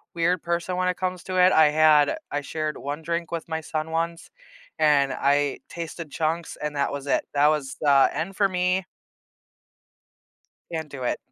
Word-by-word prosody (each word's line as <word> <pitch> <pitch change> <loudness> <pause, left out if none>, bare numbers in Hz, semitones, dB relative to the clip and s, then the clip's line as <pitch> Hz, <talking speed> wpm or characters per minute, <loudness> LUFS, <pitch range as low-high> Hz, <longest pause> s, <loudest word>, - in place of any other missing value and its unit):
weird 170 +1 +1
person 170 +1 -2
when 185 0 +1
it 180 - 0
comes 185 -1 -3
to 185 0 -4
it, 180 +1 +6
I 155 -1 +6
had 155 - +4
I 145 - -1
shared 155 +1 -3
one 145 +3 -5
drink 170 +1 -3
with 165 -1 -4
my 160 -1 -3
son 155 0 -4
once 165 +1 -3 0.5
and 145 -3 +3
I 145 0 +1
tasted 170 -1 -7
chunks, 165 +2 -2
and 150 0 -3
that 140 -1 0
was 140 0 -5
it, 140 - +1
that 145 +1 +5
was 150 -3 -1
the 140 -2 +5
end 180 +4 -4
for 200 0 +2
me. 180 0 0 1.9
Can't 160 -2 -4
do 135 -3 -7
it. 125 - 0
160 Hz, 180 wpm, -25 LUFS, 145-170 Hz, 1.9 s, it